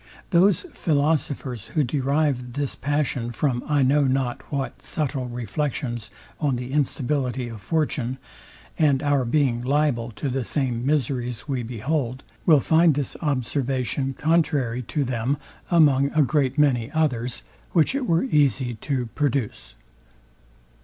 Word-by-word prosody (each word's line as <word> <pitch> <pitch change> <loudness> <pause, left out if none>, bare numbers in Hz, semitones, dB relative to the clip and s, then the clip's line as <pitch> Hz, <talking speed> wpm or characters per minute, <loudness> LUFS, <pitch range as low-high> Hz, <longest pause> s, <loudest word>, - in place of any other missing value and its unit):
Those 185 +3 +4
philosophers, 145 - -1
who 155 - +1
derive 135 -2 0
this 140 0 -2
passion 140 -5 -1
from 120 0 -1
I 145 -2 +3
know 140 +2 +3
not 130 -2 0
what 140 -2 -3
subtile 140 -5 -2
reflections 120 0 -3 0.3
on 145 -4 +1
the 125 +1 -5
instability 135 -3 0
of 110 -3 -9
fortune, 130 0 -1 0.6
and 145 -3 +3
our 145 -2 +2
being 120 -2 +1
liable 130 -3 +1
to 140 - -4
the 130 0 -1
same 125 -2 -1
miseries 125 -3 -1
we 135 -4 -1
behold, 125 +3 -2 0.2
will 155 -5 +7
find 160 0 +4
this 140 -3 -2
observation 135 -1 -1
contrary 145 -7 +1
to 140 +5 -2
them 125 +2 -1 0.3
among 145 -5 +4
a 155 0 +4
great 135 -1 +1
many 130 -6 +3
others, 125 -6 0 0.3
which 165 - +3
it 270 -2 -2
were 165 0 +3
easy 140 - +2
to 125 +3 -2
produce. 125 - -2
135 Hz, 135 wpm, -24 LUFS, 125-150 Hz, 0.6 s, will